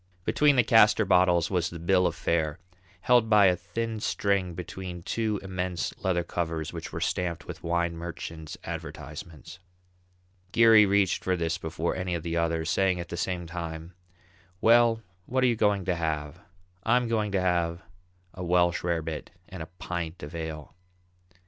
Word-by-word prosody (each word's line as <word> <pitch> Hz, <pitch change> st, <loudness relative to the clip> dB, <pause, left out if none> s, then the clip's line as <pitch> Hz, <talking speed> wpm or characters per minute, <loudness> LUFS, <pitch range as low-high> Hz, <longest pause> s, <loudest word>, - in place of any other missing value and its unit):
Between 150 Hz, -1 st, +4 dB
the 125 Hz, -, +5 dB
castor 110 Hz, -1 st, +5 dB
bottles 90 Hz, -2 st, +3 dB
was 90 Hz, -3 st, +1 dB
the 85 Hz, -, -8 dB
bill 90 Hz, +2 st, +3 dB
of -, -, -3 dB
fare, 80 Hz, -1 st, 0 dB, 0.4 s
held 120 Hz, -3 st, +4 dB
by 105 Hz, -2 st, +6 dB
a 90 Hz, -1 st, +5 dB
thin 110 Hz, +5 st, -4 dB
string 100 Hz, -4 st, 0 dB
between 90 Hz, 0 st, -7 dB
two 110 Hz, -1 st, -1 dB
immense 90 Hz, -2 st, -3 dB
leather 90 Hz, -2 st, 0 dB
covers 80 Hz, -2 st, -3 dB
which 80 Hz, -1 st, -6 dB
were 80 Hz, -, -4 dB
stamped 90 Hz, 0 st, -2 dB
with 90 Hz, -1 st, -8 dB
wine 85 Hz, 0 st, 0 dB
merchants' 85 Hz, -2 st, -7 dB
advertisements. 85 Hz, +2 st, -8 dB, 0.9 s
Geary 110 Hz, -1 st, +7 dB
reached 100 Hz, -1 st, +2 dB
for 95 Hz, -, +1 dB
this 85 Hz, +1 st, -1 dB
before 80 Hz, 0 st, -2 dB
any 90 Hz, -1 st, -2 dB
of 85 Hz, -, -4 dB
the 85 Hz, -1 st, -3 dB
others, 85 Hz, -1 st, 0 dB
saying 95 Hz, 0 st, +2 dB
at 85 Hz, -, -6 dB
the -, -, -4 dB
same 90 Hz, 0 st, -2 dB
time, 85 Hz, 0 st, -6 dB, 0.7 s
"Well, 115 Hz, 0 st, +4 dB, 0.2 s
what 130 Hz, +1 st, +1 dB
are -, -, +5 dB
you 120 Hz, -, +2 dB
going 105 Hz, -3 st, +1 dB
to 90 Hz, -, +1 dB
have? 80 Hz, -1 st, -3 dB, 0.4 s
I'm 120 Hz, +2 st, +2 dB
going 110 Hz, -2 st, 0 dB
to 95 Hz, -, +2 dB
have 85 Hz, -2 st, 0 dB, 0.5 s
a 90 Hz, -, -7 dB
Welsh 85 Hz, 0 st, +2 dB
rabbit 80 Hz, -2 st, -2 dB, 0.2 s
and 95 Hz, -3 st, -8 dB
a 80 Hz, -, -6 dB
pint 85 Hz, -1 st, -5 dB
of 75 Hz, +3 st, -7 dB
ale." 80 Hz, -2 st, -6 dB
90 Hz, 165 wpm, -27 LUFS, 85-100 Hz, 0.9 s, Geary